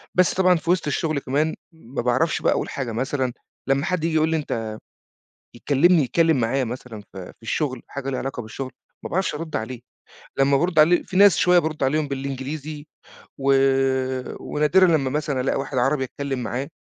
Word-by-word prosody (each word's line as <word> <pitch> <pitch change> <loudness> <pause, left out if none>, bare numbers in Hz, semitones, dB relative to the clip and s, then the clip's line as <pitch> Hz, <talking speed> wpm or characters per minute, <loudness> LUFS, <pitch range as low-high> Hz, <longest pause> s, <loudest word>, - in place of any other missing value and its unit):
بس 185 -1 +4
طبعًا 185 -1 +4
في 165 - -4
وِسط 180 -3 +2
الشغل 155 +1 0
كمان 145 +4 0 0.2
ما 140 -6 -6
باعرَفش 130 +7 +1
بقى - - +3
أقول - - -2
حاجة، 130 -4 -4
مثلًا 130 +2 -1 0.3
لما 135 +2 +1
حد 180 -4 -1
ييجي 165 -1 0
يقول 155 0 +3
لي 160 - +1
أنت 115 -7 -3 0.8
يكلّمني، 150 +7 +3
يتكلّم 160 +1 +2
معايا 130 +4 +1
مثلًا 120 -2 -7
في 95 -2 -8
في - - -44
الشغل، 130 +1 -2
حاجة 135 -1 -5
ليها 130 - -2
علاقة 130 -2 -4
بالشغل 130 +4 -7 0.3
ما - - -4
باعرَفش 185 -3 0
أرُد 160 +1 -4
عليه، 120 +2 -5 0.6
لما 135 0 +4
بارُد 170 +2 +1
عليه، 170 +3 +5
فيه 185 - -4
ناس 200 -1 +7
شوية 180 -1 +5
بارُد 155 -3 -3
عليهم 150 +3 +1
بالإنجليزي 140 +2 -5 0.5
و 135 0 +2 0.9
ونادرًا 160 +6 +3
لما 155 -6 +2
مثلًا 145 -2 -1
ألاقى 130 - 0
واحد 135 -1 -3
عربي 135 +2 +1
أتكلّم 135 0 -4
معاه 120 +4 -3
140 Hz, 180 wpm, -23 LUFS, 130-160 Hz, 0.9 s, ناس